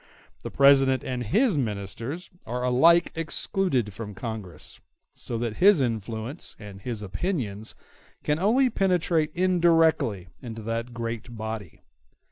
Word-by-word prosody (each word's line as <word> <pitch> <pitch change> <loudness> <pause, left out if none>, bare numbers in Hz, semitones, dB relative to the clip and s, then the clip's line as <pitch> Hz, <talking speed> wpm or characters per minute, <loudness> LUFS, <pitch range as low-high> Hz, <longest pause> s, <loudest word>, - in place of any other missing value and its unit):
The - - -5
President 135 -2 +5
and 125 -1 -3
his 205 - +2
ministers 115 - -4 0.2
are 125 +2 -3
alike 165 +8 +5
excluded 160 - -1
from 105 -1 -7
Congress; 105 -8 -6 0.3
so 115 - -5
that 115 -2 -3
his 200 -2 +6
influence 115 - -3
and 100 -2 -10
his 115 -1 -4
opinions 110 - -3 0.5
can 150 +1 0
only 245 +7 +3
penetrate 175 -6 +1
indirectly 165 - +3
into 115 -2 -7
that 115 +2 -3
great 115 0 -5
body. 110 -5 -6
125 Hz, 120 wpm, -26 LUFS, 110-165 Hz, 0.5 s, his